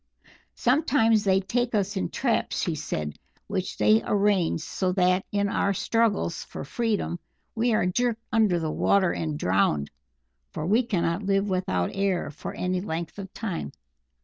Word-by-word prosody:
"Sometimes 245 -5 +3
they 190 -1 +3
take 240 +5 -1
us 205 0 0
in 190 - -1
traps," 245 -4 0
she 170 - 0
said, 80 - -4 0.3
"which - - -3
they 105 +2 +4
arrange 200 -6 +2
so 185 +3 -1
that 185 0 +2
in 200 0 +1
our 200 0 0
struggles 220 -6 0
for - - -8
freedom 210 - -1 0.3
we 235 +1 +1
are 195 - +2
jerked 230 +4 0
into 215 -6 +3
the 160 -2 -2
water 190 +1 +3
and 155 -2 -3
drowned, 90 - +1 0.6
for 155 - -3
we 215 +7 +4
cannot 185 -6 -1
live 195 0 +1
without 180 - 0
air 195 -5 0
for 150 - -7
any 180 0 -1
length 170 -1 -4
of 195 -1 -7
time. 200 -7 -4
195 Hz, 155 wpm, -26 LUFS, 170-215 Hz, 0.6 s, they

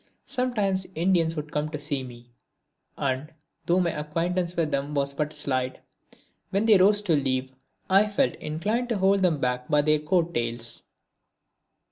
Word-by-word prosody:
Sometimes 215 -8 -1
Indians 165 -1 +2
would 150 -1 -5
come 150 +1 -1
to 150 -1 -5
see 145 -2 -2
me; 120 -1 -11 0.7
and, 140 +3 -2 0.4
though 175 +2 +3
my 175 -2 +1
acquaintance 170 +4 -2
with 160 -3 0
them 140 +2 -2
was 140 0 0
but 150 +1 -2
slight, 130 -4 -1 0.7
when 200 +3 0
they 215 -3 +7
rose 205 +2 +5
to 170 -6 +2
leave 130 -2 -1 0.4
I 195 +3 +5
felt 210 +6 +1
inclined 210 +11 -2
to 230 - 0
hold 195 +1 +3
them 170 -5 +2
back 125 -1 -1
by 150 -1 +3
their 155 0 +3
coat 170 +2 0
tails. 115 -2 -2
155 Hz, 160 wpm, -26 LUFS, 140-190 Hz, 0.7 s, they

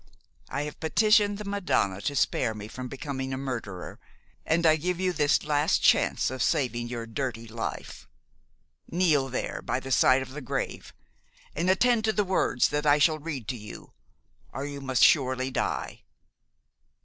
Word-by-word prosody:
I 140 +2 -2
have 150 0 -7
petitioned 205 +4 +3
the 210 - -7
Madonna 180 - 0
to 145 - -2
spare 120 -3 +1
me 105 0 -7
from 125 +3 -7
becoming 135 0 -5
a 130 - -2
murderer, 115 -9 -6 0.5
and 170 +1 +2
I 155 -1 +6
give 175 +3 -2
you 185 -1 0
this 145 -3 +2
last 150 +1 +1
chance - - +3
of 130 -1 -5
saving 120 -2 0
your 120 -1 -5
dirty 115 -1 -4
life. 115 +1 -6 0.8
Kneel 155 -6 +2
there, 130 - -3
by 125 - -2
the 135 0 -8
side 130 +1 +4
of 130 - -11
the 150 +3 -7
grave, 130 - -4 0.6
and 170 +4 0
attend 230 +4 +3
to 220 - +1
the 210 - +1
words 180 -9 +2
that 150 +1 -1
I 145 0 +6
shall 155 +1 +3
read 145 -7 -6
to 130 - -2
you, 105 -2 -11 0.6
or 135 - -5
you 145 -1 -6
must 130 -2 +1
surely 130 -2 +3
die! - - -3
140 Hz, 170 wpm, -27 LUFS, 125-160 Hz, 0.8 s, I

